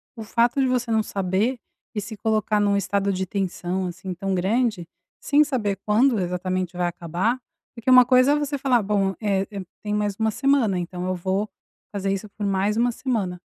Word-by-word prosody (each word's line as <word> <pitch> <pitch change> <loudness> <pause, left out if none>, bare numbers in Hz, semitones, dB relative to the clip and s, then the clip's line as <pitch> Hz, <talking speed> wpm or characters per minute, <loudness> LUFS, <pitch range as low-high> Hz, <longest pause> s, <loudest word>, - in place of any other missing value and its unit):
o 225 - -7
fato 235 +4 +1
de 265 - +3
você 250 -2 0
não 220 -1 +3
saber 200 +5 -1 0.4
e - - 0
se 220 +2 -7
colocar 215 0 +1
num 200 -1 +2
estado 200 +1 0
de 190 0 -2
tensão, 185 -1 -2
assim, 185 +1 -6
tão 195 +2 -2
grande, 205 -1 0 0.3
sem 290 +1 +4
saber 230 -9 -1
quando 225 +2 +3
exatamente 180 0 -2
vai 180 - +1
acabar, 175 +8 -1 0.4
porque 230 +1 -3
uma 255 -1 +8
coisa 255 +3 +5
é - - +3
você 290 -1 -1
falar: 255 -4 +2
"Bom, 195 -1 0
é, 195 -2 +1 0.4
tem 210 -1 -3
mais 210 -1 -1
1 220 0 +2
semana 250 -4 +2
então 180 0 -4
eu 185 - 0
vou 190 +4 -1 0.4
fazer 195 -1 -2
isso 195 +2 -5
por 210 - -2
mais 200 +2 +1
1 240 +1 +3
semana", 210 -8 -2
205 Hz, 190 wpm, -24 LUFS, 190-235 Hz, 0.4 s, uma